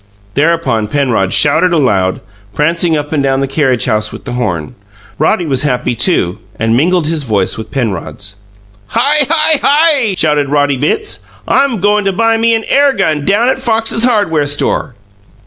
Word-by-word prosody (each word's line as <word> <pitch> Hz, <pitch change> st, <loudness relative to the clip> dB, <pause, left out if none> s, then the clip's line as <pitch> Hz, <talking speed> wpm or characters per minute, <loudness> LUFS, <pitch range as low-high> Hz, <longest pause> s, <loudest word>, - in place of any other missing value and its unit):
Thereupon 150 Hz, -7 st, 0 dB
Penrod 120 Hz, -8 st, 0 dB
shouted 155 Hz, +5 st, +3 dB
aloud, 100 Hz, -, +1 dB, 0.3 s
prancing 165 Hz, +2 st, +1 dB
up 145 Hz, 0 st, -5 dB
and 150 Hz, -3 st, 0 dB
down 135 Hz, -1 st, 0 dB
the 135 Hz, -, 0 dB
carriage 135 Hz, -4 st, 0 dB
house 105 Hz, 0 st, 0 dB
with -, -, -10 dB
the 130 Hz, -, -5 dB
horn. 90 Hz, -, -3 dB, 0.5 s
Roddy 175 Hz, -, +1 dB
was 135 Hz, -4 st, 0 dB
happy, 125 Hz, -4 st, -1 dB
too, 110 Hz, -, 0 dB, 0.2 s
land 115 Hz, +1 st, +1 dB
mingled 170 Hz, +5 st, +1 dB
his 160 Hz, 0 st, -1 dB
voice 100 Hz, -7 st, 0 dB
with 110 Hz, -, -8 dB
Penrod's. 100 Hz, -, -4 dB, 0.5 s
"Hi! 290 Hz, -, +1 dB
Hi! 315 Hz, -2 st, +2 dB
Hi!" 285 Hz, -, +2 dB
shouted 150 Hz, -4 st, +1 dB
Roddy 145 Hz, -1 st, +1 dB
Bitts. 155 Hz, -, -2 dB, 0.3 s
"I'm 275 Hz, -6 st, +1 dB
goin' 205 Hz, +1 st, +2 dB
to 195 Hz, -, 0 dB
buy 225 Hz, +3 st, +1 dB
me 230 Hz, 0 st, +2 dB
an 225 Hz, -, -2 dB
air 280 Hz, +2 st, +2 dB
gun 150 Hz, -, -1 dB
down 205 Hz, +5 st, +2 dB
at 265 Hz, -, 0 dB
Fox's 225 Hz, -2 st, 0 dB
hardware 205 Hz, -, +1 dB
store!" 145 Hz, -3 st, -1 dB
150 Hz, 165 wpm, -12 LUFS, -, 0.5 s, shouted